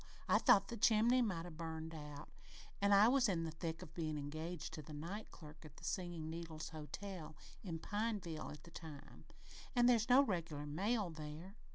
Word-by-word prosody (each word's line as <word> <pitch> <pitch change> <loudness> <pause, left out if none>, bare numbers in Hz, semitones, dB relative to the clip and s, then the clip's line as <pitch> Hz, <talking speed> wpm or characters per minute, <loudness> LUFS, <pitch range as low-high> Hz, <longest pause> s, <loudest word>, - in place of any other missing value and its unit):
I - - +5
thought 200 -1 +6
the 235 - -4
chimney 230 +4 +5
might 185 -8 0
'a' 175 - -7
burned 160 0 -5
out 150 -2 -8 0.5
an' 200 0 +4
I 200 +2 +8
was 255 -2 +4
in 170 -4 +1
the 165 - -3
thick 160 0 -4
of 155 - -12
bein' 155 -3 -2
engaged 155 +3 -4
to 155 - -5
the 150 +1 -10
night 180 +8 -5
clerk 155 0 -12
at 155 -2 -13
the - - -14
Singin' 175 -4 -2
Needles 160 -1 -5
Hotel 155 +1 -7 0.3
at 165 -5 -4
Pineville 205 -6 -2
at 150 -1 -9
the 170 - -13
time 155 -4 -10 0.5
an' 240 -1 +5
there's 240 -1 +5
no 260 +3 +8
regular 165 - -2
mail 195 +6 0
there. 160 +5 -8
165 Hz, 190 wpm, -39 LUFS, 155-205 Hz, 0.5 s, I